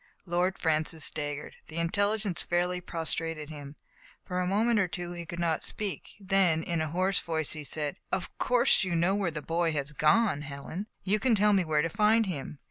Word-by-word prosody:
Lord 180 +2 0
Francis 160 -1 +1
staggered. 145 0 -3
The 155 - -8
intelligence 200 +2 +1
fairly 180 +1 0
prostrated 165 -2 -3
him. 145 -1 -9 0.5
For 180 0 -2
a 180 - 0
moment 215 +4 +3
or 195 - +2
two 175 +1 -5
he 170 -1 -6
could 170 - -6
not 170 -2 0
speak; 205 -3 -5
then, 190 -5 +2
in 170 -1 -1
a 155 - 0
hoarse 185 +4 +2
voice, 160 -3 -2
he 155 -1 -5
said: 145 +2 -4
Of 190 - -2
course 245 -2 +4
you 180 -2 -1
know 170 +3 +3
where 200 -3 +1
the 155 -2 -6
boy 165 0 +1
has 145 -1 -2
gone, 155 +3 +3
Helen? 150 +7 -6 0.2
You 205 +3 +2
can 250 -1 +3
tell 210 0 +4
me 195 -2 +4
where 155 -2 +1
to - - +1
find 215 +4 +3
him? 150 -5 -5
175 Hz, 200 wpm, -29 LUFS, 155-195 Hz, 0.5 s, course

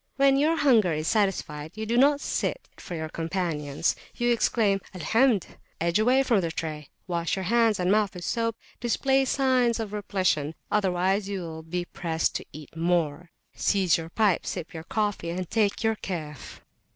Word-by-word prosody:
When 275 -1 +4
your 310 +4 +2
hunger 225 - +4
is 155 +1 -2
satisfied, 165 -8 -1
you 220 - -3
do 230 +2 -1
not 285 +3 +4
sit - - -2
for 175 - -7
your 160 -1 -3
companions; 165 -3 -1 0.2
you 240 0 +2
exclaim 210 -4 +2
Al 180 - -6
Hamd! 225 - +3 0.3
edge 170 +4 +1
away 255 +5 +4
from 230 -7 +2
the 170 - -1
tray, 155 -3 -5 0.2
wash 170 -2 -1
your 190 - -3
hands 225 +1 +3
and 180 +1 +2
mouth 210 -2 +2
with 175 - -7
soap, 230 -1 -1 0.2
display 265 +3 +2
signs 255 -3 +2
of 215 -2 -4
repletion, 185 -7 0 0.2
otherwise 195 0 +1
you 195 -2 -3
will 160 -2 -7
be 175 +2 -4
pressed 165 -2 -1
to - - -10
eat 155 +1 -11
more, 165 -1 0 0.2
seize 190 -4 +2
your 165 0 -4
pipe, 205 -1 +2
sip 170 -2 -5
your 160 -1 -7
coffee, 205 -5 -1
and 180 0 -4
take 215 -1 +1
your 220 -1 +1
Kayf. 155 -9 -6
190 Hz, 175 wpm, -26 LUFS, 165-225 Hz, 0.3 s, When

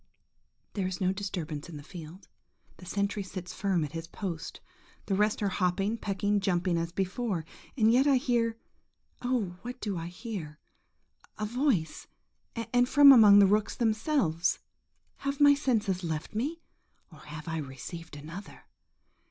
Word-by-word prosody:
There 195 -3 -1
is 185 -1 -4
no 185 -1 +1
disturbance 175 -6 -5
in 160 - -8
the 145 - -10
field; 170 +3 -11 0.5
the 180 - -13
sentry 200 +2 -1
sits 185 -2 -7
firm 190 -5 0
at 145 - -8
his 165 0 -6
post; 170 -3 -6 0.5
the 195 - -1
rest 210 +2 +1
are 200 - +2
hopping, 195 +3 0
pecking, 205 -1 0
jumping 180 -2 0
as 165 0 -1
before; 190 -1 -2 0.3
and 225 -1 +4
yet 265 +4 +4
I 280 - +5
hear–oh, 235 -3 -3
what 245 +2 -7
do 200 -7 -3
I 165 - -5
hear?–a 180 +1 -9
voice–and 245 - -2
from 285 +1 +9
among 215 -6 +8
the 200 - +8
rooks 210 +2 +1
themselves! 220 - +1 0.6
Have 275 0 -3
my 285 -1 +8
senses 220 -10 0
left 160 +1 -4
me, 290 +10 -3 0.5
or 155 - -14
have 150 +4 -9
I 160 -1 -2
received 150 +4 -7
another? 165 +7 -10
195 Hz, 145 wpm, -29 LUFS, 170-230 Hz, 0.6 s, from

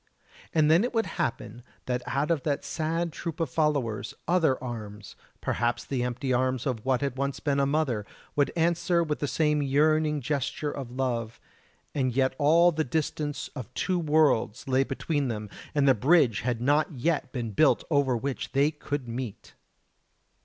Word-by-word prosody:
And 155 -1 +3
then 170 +6 +5
it 245 0 -2
would 225 - +2
happen 120 0 -3 0.2
that 125 -1 -1
out 140 +5 0
of 160 -4 +1
that 145 -1 -2
sad 165 +1 -2
troop 170 -1 -5
of 165 - -1
followers 140 -9 0
other 165 -6 +3
arms 105 -4 -7 0.3
perhaps 120 0 -1
the 130 -3 -2
empty 125 +2 -1
arms 130 0 0
of 125 -6 -2
what 130 -1 +1
had 135 -2 -2
once 140 0 -1
been 140 -2 0
a 140 - +3
mother 135 -8 0 0.3
would 145 -1 +2
answer 170 +1 +2
with 150 -2 -2
the 145 - -1
same 150 0 +1
yearning 150 +2 +2
gesture 145 +2 -2
of 135 -4 -6
love, 120 -3 -2 0.5
and 130 -4 0
yet 130 0 +2
all 165 +4 +5
the 155 -1 0
distance 145 0 -2
of 125 -4 -8
two 185 -2 0
worlds 150 -7 +2
lay 130 0 +3
between 140 +1 -2
them, 105 -3 -4 0.2
and 140 -1 +3
the 135 - +7
bridge 130 - +3
had 120 0 -2
not 145 +6 +2
yet 140 0 -1
been 120 -4 -3
built 140 +8 +3
over 140 -4 +3
which 135 +3 -4
they 140 +2 +3
could 145 -3 -4
meet! 120 -2 -6
140 Hz, 175 wpm, -27 LUFS, 125-155 Hz, 0.5 s, the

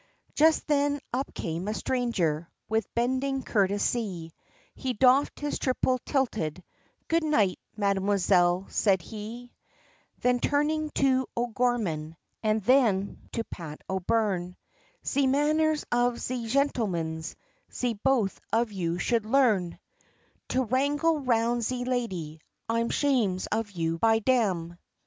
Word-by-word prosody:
Just 315 +1 +4
then 285 -1 +1
up 265 +3 -2
came 170 +3 -4
a 215 - -1
stranger, 180 -13 -1 0.2
with 220 -2 -1
bending 260 +3 0
courtesy, 200 -4 0 0.4
He 260 -2 -3
doffed 255 +5 +3
his 295 0 -2
triple 255 -1 +1
tilted, 215 - -1 0.4
"Good 330 0 +2
night, 220 -12 +2 0.2
mam'selle," 195 -2 +2
said 190 -5 +2
he, 225 +5 -8 0.7
Then 250 0 +2
turning 300 +3 +1
to 260 -2 +2
O'Gorman, 225 -10 -1 0.2
and 215 -1 +1
then, 215 -5 +3
to 230 - -1
Pat 160 -8 -9
O'Byrne, 190 -1 -1 0.5
"Ze 280 -1 +2
manners 305 +3 +2
of 245 0 +2
ze 245 -2 -3
shentlemans, 185 - -1 0.4
ze 245 -2 -1
both 225 -2 0
of 230 0 +1
you 175 -3 -2
should 225 +3 0
learn; 220 -9 +2 0.7
To 260 - +1
wrangle 290 +6 +1
round 240 -2 +1
ze 245 +2 -2
lady, 185 -12 -3 0.3
I'm 230 +1 0
shames 230 -11 +1
of 220 0 -1
you, 165 -3 -2
by 225 +2 +4
dam! 195 -8 0
230 Hz, 120 wpm, -27 LUFS, 190-260 Hz, 0.7 s, Just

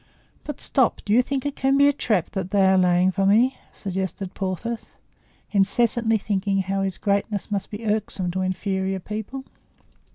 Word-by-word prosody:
"But, 295 - -6
stop; 260 -4 +1
do 205 - +1
you 245 - +6
think 270 +1 -3
it 285 - -2
can 270 +1 +2
be 285 0 +6
a 285 - +4
trap 215 - 0
that 190 -2 -3
they 195 -1 +3
are 190 0 +5
laying 180 0 +4
for 195 +1 +2
us?" 240 +5 +5 0.2
suggested 190 0 -4
Porthos, 200 +5 -4 0.6
incessantly 225 +3 +2
thinking 195 -1 0
how 195 +1 -1
his 190 -2 -2
greatness 200 +1 -1
must 200 -2 -2
be 215 +2 -7
irksome 210 -4 -1
to 185 +2 -2
inferior 190 0 -1
people. 220 +7 -6
200 Hz, 170 wpm, -24 LUFS, 190-230 Hz, 0.6 s, you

